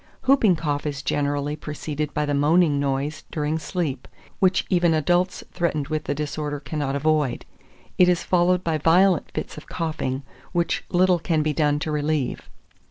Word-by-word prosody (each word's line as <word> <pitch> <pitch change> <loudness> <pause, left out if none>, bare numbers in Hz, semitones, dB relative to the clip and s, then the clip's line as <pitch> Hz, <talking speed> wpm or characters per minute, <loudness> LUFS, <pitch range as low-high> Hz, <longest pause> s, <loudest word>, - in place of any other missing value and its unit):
2408. - - -19
Hooping 220 -9 +4
Cough 145 -3 -2
is 145 -1 -4
generally 145 +1 -1
preceded 150 0 -4
by 150 - -1
the 145 - -1
moaning 150 +1 +3
noise 140 +2 -2
during 155 +1 -1
sleep, 160 -4 -3 0.3
which 190 0 +3
even 175 -3 +3
adults 175 +4 +1
threatened 155 -5 -1
with 155 -1 -2
the 140 - -1
disorder 150 0 -3
cannot 145 -1 -3
avoid: 150 -3 0 0.5
it 180 -1 +7
is 175 -1 +1
followed 180 0 +2
by 160 -2 0
violent 175 +2 +4
fits - - -5
of 150 - -10
coughing, 155 -5 -3 0.3
which 170 -1 0
little 180 0 +3
can 160 -2 0
be 155 0 0
done 150 -1 +2
to 155 +1 -3
relieve. 150 -2 -1
155 Hz, 165 wpm, -24 LUFS, 145-175 Hz, 0.5 s, it